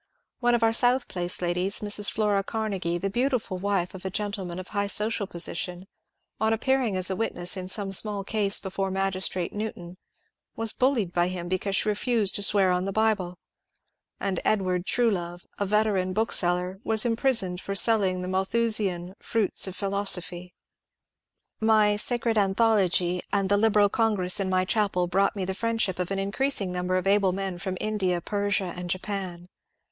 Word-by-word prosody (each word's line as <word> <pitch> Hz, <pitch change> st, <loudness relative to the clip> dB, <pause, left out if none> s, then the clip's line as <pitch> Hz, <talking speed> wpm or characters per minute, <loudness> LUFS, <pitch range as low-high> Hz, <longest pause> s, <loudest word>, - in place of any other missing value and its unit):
One 240 Hz, -1 st, +3 dB
of 235 Hz, -, 0 dB
our 225 Hz, 0 st, +4 dB
South 245 Hz, +2 st, +3 dB
Place 180 Hz, 0 st, -1 dB
ladies, 180 Hz, +3 st, -1 dB
Mrs. 205 Hz, 0 st, +2 dB
flora 205 Hz, -2 st, +1 dB
Carne^e, 195 Hz, -6 st, -2 dB
the 195 Hz, +3 st, -1 dB
beautiful 240 Hz, -5 st, -1 dB
wife 195 Hz, -2 st, -1 dB
of 190 Hz, -, -9 dB
a 190 Hz, -, -2 dB
gentleman 195 Hz, -3 st, -4 dB
of 185 Hz, -1 st, -7 dB
high 200 Hz, -1 st, -1 dB
social 210 Hz, 0 st, +1 dB
po 175 Hz, -, -10 dB
sition, 175 Hz, +1 st, -2 dB, 0.6 s
on 220 Hz, +1 st, +2 dB
appearing 250 Hz, -2 st, +1 dB
as 185 Hz, +1 st, +1 dB
a -, -, -1 dB
witness 180 Hz, -4 st, -1 dB
in 185 Hz, -1 st, -5 dB
some 195 Hz, 0 st, -1 dB
small 200 Hz, +1 st, +1 dB
case 205 Hz, -1 st, +1 dB
before 195 Hz, 0 st, -3 dB
Magistrate 190 Hz, -2 st, -1 dB
Newton, 185 Hz, -4 st, -6 dB, 0.6 s
was 225 Hz, -1 st, 0 dB
bullied 245 Hz, -9 st, +1 dB
by 175 Hz, 0 st, +2 dB
him 180 Hz, -1 st, -5 dB
because 185 Hz, +2 st, -1 dB
she 215 Hz, -, +1 dB
refused 215 Hz, -1 st, 0 dB
to -, -, -1 dB
swear 195 Hz, -2 st, +4 dB
on 180 Hz, +1 st, 0 dB
the 195 Hz, -, -2 dB
Bible; 200 Hz, -4 st, 0 dB, 0.8 s
and 195 Hz, -2 st, -1 dB
Edward 185 Hz, -3 st, 0 dB
Truelove, 180 Hz, -7 st, -1 dB
a 200 Hz, -, 0 dB
veteran 200 Hz, -3 st, +1 dB
book 220 Hz, +3 st, 0 dB
seller, 180 Hz, +1 st, +1 dB
was 220 Hz, 0 st, +2 dB
imprisoned 225 Hz, -6 st, +1 dB
for 195 Hz, -, -4 dB
selling 195 Hz, -4 st, +2 dB
the -, -, -4 dB
Malthusian 190 Hz, -2 st, 0 dB
^* -, -, -14 dB
Fruits 215 Hz, -3 st, 0 dB
of 185 Hz, -, -6 dB
Philosophy." 180 Hz, -3 st, -1 dB, 1.0 s
My 220 Hz, -1 st, +4 dB
^^ 205 Hz, -, -2 dB
Sacred 235 Hz, -1 st, +1 dB
Anthology 190 Hz, -4 st, +2 dB
" -, -, -37 dB
and 200 Hz, -1 st, +1 dB
the 205 Hz, -, +4 dB
Liberal 210 Hz, -1 st, +4 dB
Congress 205 Hz, -5 st, +1 dB
in 195 Hz, -1 st, -1 dB
my 185 Hz, 0 st, +2 dB
chapel 200 Hz, -3 st, +1 dB
brought 195 Hz, +4 st, +1 dB
me 195 Hz, -2 st, -2 dB
the 190 Hz, -, -2 dB
friendship 225 Hz, -3 st, -1 dB
of 180 Hz, -, -2 dB
an 195 Hz, -, -2 dB
increasing 200 Hz, 0 st, -1 dB
numbtf 180 Hz, +1 st, -1 dB
of 185 Hz, -, -2 dB
able 195 Hz, -1 st, +3 dB
men 190 Hz, -2 st, -3 dB
from 185 Hz, +1 st, -4 dB
India, 195 Hz, -5 st, 0 dB
Persia, 200 Hz, -1 st, -1 dB
and 180 Hz, 0 st, -6 dB
Japan. 185 Hz, -2 st, -4 dB
195 Hz, 180 wpm, -26 LUFS, 185-215 Hz, 1.0 s, our